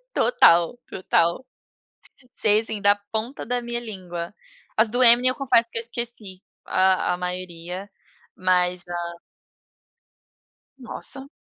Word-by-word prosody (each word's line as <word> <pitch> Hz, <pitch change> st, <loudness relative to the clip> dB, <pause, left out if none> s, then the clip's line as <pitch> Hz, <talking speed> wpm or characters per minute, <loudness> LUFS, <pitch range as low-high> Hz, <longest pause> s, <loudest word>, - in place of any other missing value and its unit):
Total, 175 Hz, -, +4 dB
total. 170 Hz, +3 st, 0 dB, 0.9 s
Sei 215 Hz, 0 st, +3 dB
sim, 220 Hz, -2 st, -4 dB
da 205 Hz, 0 st, +5 dB, 0.2 s
ponta 225 Hz, +5 st, -4 dB
da 245 Hz, +1 st, -1 dB
minha 240 Hz, 0 st, -3 dB
língua. 185 Hz, -6 st, -7 dB, 0.4 s
As 220 Hz, 0 st, +3 dB
do 245 Hz, +3 st, -1 dB
Eminem, 245 Hz, +2 st, +7 dB
eu 255 Hz, -, -2 dB
confesso 245 Hz, -4 st, +2 dB
que -, -, -7 dB
eu 230 Hz, -, -1 dB
esqueci 230 Hz, -5 st, -7 dB, 0.2 s
a 185 Hz, -1 st, +2 dB
a 180 Hz, -, -3 dB
maioria, 180 Hz, +1 st, -6 dB, 0.5 s
mas 180 Hz, -1 st, +1 dB
a 170 Hz, -1 st, -5 dB, 1.6 s
Nossa. 270 Hz, +2 st, -8 dB
205 Hz, 120 wpm, -23 LUFS, 180-235 Hz, 1.6 s, Eminem